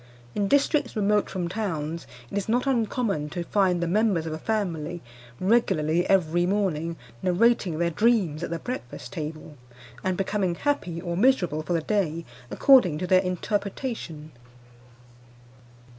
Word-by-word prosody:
In 200 -1 0
districts 285 +1 +2
remote 210 0 +2
from 180 -2 -3
towns 170 -5 -3 0.2
it - - -5
is 200 +1 -2
not 245 +4 +2
uncommon 225 - 0
to 175 +3 -4
find 180 -1 +1
the - - 0
members 195 -3 +2
of 160 - -3
a 155 - -5
family 175 -6 -2 0.4
regularly 185 -5 +2
every 175 -2 +3
morning 170 -5 0 0.3
narrating 185 -2 +2
their 170 +1 +1
dreams 195 -6 +2
at - - -3
the 170 - -2
breakfast 145 - -7
table, 155 -1 -6 0.5
and 185 -1 0
becoming 195 -2 0
happy 185 - -1
or 170 -1 -3
miserable 180 - +2
for 165 +3 -3
the 165 - +1
day 170 -4 -1 0.2
according 245 - +5
to 180 - -3
their 185 +1 +4
interpretation. 190 - -3
180 Hz, 145 wpm, -26 LUFS, 165-210 Hz, 0.5 s, according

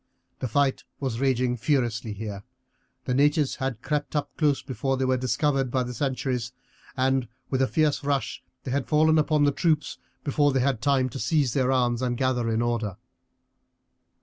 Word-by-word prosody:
The 130 - -2
fight 135 +3 +1 0.2
was 130 -5 -2
raging 130 -2 +1
furiously 120 -3 0
here. 105 -1 -6 0.6
The 125 - 0
natives 145 +1 +2
had 125 -4 -3
crept 150 0 -2
up 145 -1 -2
close 145 -3 +1
before 135 0 -2
they 130 - 0
were 130 0 +2
discovered 130 +2 0
by 130 +1 0
the 125 0 -5
sentries, 125 -2 -2 0.4
and 130 -1 +1 0.2
with 130 -1 +1
a 130 - +3
fierce 150 -1 +1
rush 140 -1 -1 0.2
they 130 - -4
had 135 -1 -1
fallen 155 +1 +4
upon 150 -1 +2
the 145 - +4
troops 155 0 0 0.2
before 145 0 +2
they 135 - +2
had 130 -3 +1
time 135 -2 +2
to 135 - -7
seize 145 -6 +1
their 130 -1 +2
arms 120 -2 +1
and 125 -1 -1
gather 125 -3 +1
in 115 +1 +1
order. 115 -5 -1
130 Hz, 175 wpm, -26 LUFS, 125-145 Hz, 0.6 s, fallen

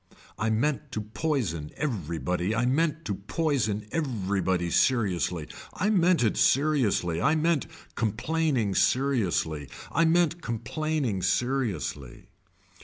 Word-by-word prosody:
I 110 +2 +1
meant 120 +2 0
to 110 - -2
poison 110 - -2
everybody 90 - -2
I 120 +1 +1
meant 155 +4 +1
to 105 - -1
poison 110 - -1
everybody 95 - -1
seriously, 90 - +1 0.3
I 210 +4 0
meant 180 - +3
it 110 - +1
seriously 120 - +2
I 155 +9 +3
meant 160 -1 +1 0.3
complaining 125 -1 0
seriously, 95 - +1 0.2
I 165 - +3
meant 170 0 +2
complaining 120 -1 -2
seriously. 105 - -2
115 Hz, 110 wpm, -27 LUFS, 95-155 Hz, 0.3 s, meant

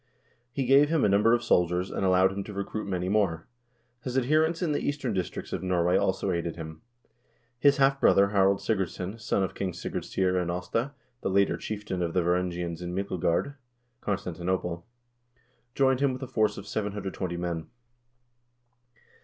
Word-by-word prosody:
He 135 +2 -2
gave 140 +3 +5
him 160 -2 +2
a - - +3
num 100 +1 +4
ber 115 +2 +4
of 120 0 +2
soldiers, 90 +1 +2
and - - -2
allowed 95 0 +4
him 100 0 -4
to 105 - -8
recruit 100 +2 -4
many 90 -1 -1
more.1 95 -5 +1 0.6
His 125 0 -2
adher 150 +5 +3
ents 165 +2 -1
in 165 - +1
the 145 - +1
eastern 140 -5 -2
districts 95 -3 -4
of - - -2
Norway 90 -1 +1
also 100 - +1
aided 85 -1 -2
him. 80 -1 -8 0.8
His 140 +2 +5
half 135 0 +3
brother 100 0 +5
Harald 100 -1 +3
Sigurdsson, 95 0 -2
son 100 -2 0
of 95 - -3
King 95 -2 -3
Sigurd 85 - -4
Syr 95 -1 0
and 90 -1 -2
Aasta, 110 +10 -2 0.3
the - - -1
later 100 +1 +3
chieftain 105 -4 -4
of 85 -1 -1
the 90 - +3
Varangians 90 -1 -1
in 90 0 -4
Myklegard 95 +5 0 0.5
(Constantinople), 90 -2 -2 0.9
joined 130 -2 +3
him 140 -2 +2
with 130 +1 -6
a - - -4
force 110 -2 +1
of 100 - -7
720 100 -4 -3
men. 85 -2 -3
95 Hz, 175 wpm, -28 LUFS, 90-115 Hz, 0.9 s, gave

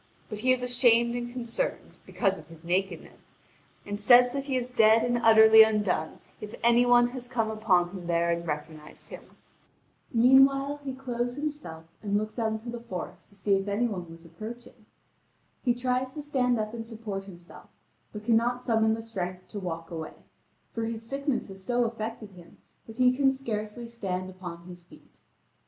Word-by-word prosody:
But 210 - -6
he 255 +4 +2
is 255 -1 +1
ashamed 240 -1 +3
and 240 0 -4
concerned, 250 - -4
because 195 -3 0
of - - -15
his 165 -1 -15
nakedness, 180 0 -3 0.5
and 205 0 -5
says 245 +4 +6
that 275 +1 -4
he 270 -2 -2
is 245 -1 -2
dead 225 -2 +4
and 240 0 +1
utterly 220 -1 +8
undone 210 -7 +1 0.2
if 210 0 -8
any 235 +1 +4
one 240 0 +5
has 250 -1 -6
come 230 -3 -1
upon 185 -5 +2
him 180 -3 -8
there 170 0 +1
and 170 0 -3
recognised 150 0 -6
him. - - -12 0.7
Meanwhile, 275 +4 +4
he 265 -2 -5
clothes 245 -2 -3
himself 290 - -5 0.2
and 205 -1 0
looks 215 +3 -4
out 220 -1 0
into 220 +2 -6
the 240 - -6
forest 195 -7 -8
to 200 - -20
see 200 0 +1
if 195 +1 -4
any 205 +4 0
one 180 -7 -4
was 165 +1 -13
approaching. 220 +6 -10 0.8
He 245 -2 +2
tries 255 +2 -1
to 300 - -5
stand 250 -5 +1
up 215 +1 -3
and 230 -1 -5
support 220 -4 -6
himself, 175 -3 -14 0.4
but 210 0 -9
cannot 240 +2 +2
summon 220 -2 +2
the 225 - -7
strength 185 -5 -6
to 205 - -6
walk 165 -3 -6
away, 160 -2 -6 0.6
for 230 - -3
his 225 0 -5
sickness 275 +3 -2
has 190 0 -11
so 245 +4 +1
affected 225 -2 -5
him 175 -2 -16 0.3
that 225 0 -11
he 255 0 +4
can 270 0 +3
scarcely 235 -3 -4
stand 190 -5 -4
upon 175 -2 -9
his 175 -1 -11
feet. 175 - -20
225 Hz, 180 wpm, -27 LUFS, 190-245 Hz, 0.8 s, utterly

